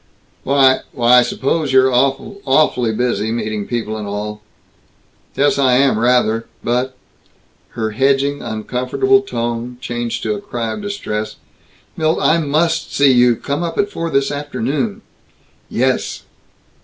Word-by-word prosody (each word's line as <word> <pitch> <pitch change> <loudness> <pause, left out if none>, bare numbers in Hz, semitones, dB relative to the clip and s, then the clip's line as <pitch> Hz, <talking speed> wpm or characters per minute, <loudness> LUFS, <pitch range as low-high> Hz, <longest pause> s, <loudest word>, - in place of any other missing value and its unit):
"Why 135 -1 +4
why 125 0 +5
I - - +5
suppose 135 +4 -1
you're 130 0 +4
awful 140 +11 0
awfully 130 -4 +2
busy, 110 -1 -1
meeting 110 -3 -3
people 110 -2 -3
and 105 -1 -5
all 105 +1 -5 0.5
" - - -38
"Yes, 145 0 +2
I 130 -2 +4
am, 130 -4 +3
rather, 115 -2 +2 0.2
but 125 +2 -1 0.4
" - - -38
Her 110 -1 -1
hedging 135 +4 +1
uncomfortable 125 - 0
tone 120 - -4
changed 120 -1 -4
to - - 0
a 205 - -5
cry 120 - -4
of - - -6
distress. 200 - -4 0.6
"Milt! 160 +1 +1
I 170 - +3
must 160 +2 0
see 140 -1 +5
you. 125 -1 +4
Come 140 +7 -3
up 170 -1 -3
at 205 0 +1
four 165 0 -3
this 140 -2 +1
afternoon." 145 - -3 0.7
"Yes!" - - -1
130 Hz, 145 wpm, -18 LUFS, 115-145 Hz, 0.7 s, why